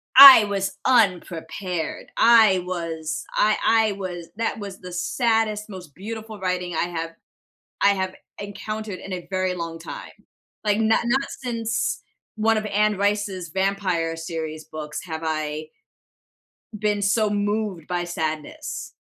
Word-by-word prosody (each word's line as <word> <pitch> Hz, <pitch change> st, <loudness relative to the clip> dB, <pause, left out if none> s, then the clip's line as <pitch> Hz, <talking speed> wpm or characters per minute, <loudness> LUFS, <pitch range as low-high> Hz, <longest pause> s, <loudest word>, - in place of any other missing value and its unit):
I 270 Hz, -4 st, +12 dB
was 195 Hz, -1 st, -2 dB
unprepared, 180 Hz, -6 st, 0 dB
I 220 Hz, -5 st, +6 dB
was 165 Hz, -3 st, -4 dB
I 215 Hz, 0 st, +3 dB
I 225 Hz, -1 st, +4 dB
was 180 Hz, -4 st, -6 dB
that 225 Hz, 0 st, -1 dB
was 200 Hz, -2 st, -7 dB
the 180 Hz, 0 st, -9 dB
saddest, 215 Hz, +3 st, 0 dB
most 180 Hz, -7 st, -10 dB
beautiful 220 Hz, +2 st, -7 dB
writing 180 Hz, -2 st, -2 dB
I -, -, +1 dB
have 165 Hz, -1 st, -3 dB, 0.7 s
I 200 Hz, -, +6 dB
have 190 Hz, -2 st, 0 dB, 0.3 s
encountered 205 Hz, 0 st, -5 dB
in 195 Hz, -, -9 dB
a 180 Hz, -2 st, -5 dB
very 185 Hz, -1 st, 0 dB
long 165 Hz, -2 st, -5 dB
time, 165 Hz, -, -8 dB, 0.5 s
like, 210 Hz, -1 st, +2 dB
not 220 Hz, 0 st, +3 dB
not 265 Hz, +4 st, +1 dB, 0.2 s
since 230 Hz, -2 st, -1 dB, 0.3 s
one 220 Hz, +1 st, +2 dB
of 215 Hz, -, -2 dB
Anne 210 Hz, +1 st, +2 dB
Rice's 200 Hz, -3 st, -1 dB
vampire 190 Hz, -3 st, 0 dB
series 160 Hz, -1 st, -5 dB
books 150 Hz, -1 st, -6 dB
have 160 Hz, -2 st, -6 dB
I 155 Hz, 0 st, -3 dB, 1.1 s
been 210 Hz, -1 st, 0 dB
so 210 Hz, +2 st, +2 dB
moved 205 Hz, -4 st, -1 dB
by 175 Hz, -1 st, -1 dB
sadness. 155 Hz, -3 st, -4 dB
190 Hz, 135 wpm, -23 LUFS, 170-215 Hz, 1.1 s, I